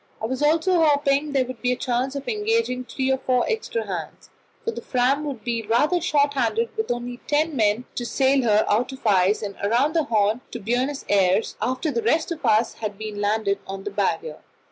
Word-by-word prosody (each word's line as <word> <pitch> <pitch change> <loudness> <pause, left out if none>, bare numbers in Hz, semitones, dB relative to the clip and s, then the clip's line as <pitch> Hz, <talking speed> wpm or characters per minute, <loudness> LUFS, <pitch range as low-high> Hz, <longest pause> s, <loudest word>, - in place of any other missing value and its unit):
I - - -3
was 260 +4 -3
also 330 +3 +3
hoping 285 -1 +2
that 290 - -6
there 265 -2 +2
would 255 -2 -8
be 250 - +1
a - - +1
chance 255 +1 -1
of 280 0 -5
engaging 425 - 0
three 265 +2 -1
or 265 - +1
four 255 -1 +1
extra 460 0 -2
hands, - - -7 0.3
for 460 - 0
the - - -7
Fram 260 +3 +1
would 265 -7 -5
be 235 0 -1
rather 290 - +2
short 290 -3 +2
handed 230 -3 0
with 440 - -2
only 245 0 -3
ten 300 +1 +1
men 220 +1 +1
to 245 - -4
sail 265 +3 +2
her 215 -3 +3
out 240 +5 +1
of 265 - -11
the 220 - +2
ice 195 +2 +3
and 200 -1 -5
round 245 +9 +2
the 320 -3 +2
Horn 215 0 +1
to 240 - -6
Buenos 250 +6 -1
Aires 195 +1 +2
after 260 +5 -1
the 235 - -1
rest 315 +10 +1
of 330 -1 -5
us 220 +2 +3
had 210 -3 -5
been 215 -1 -5
landed 205 -1 0
on 195 0 -6
the 205 - -4
Barrier. 205 - -2
250 Hz, 220 wpm, -23 LUFS, 220-290 Hz, 0.3 s, also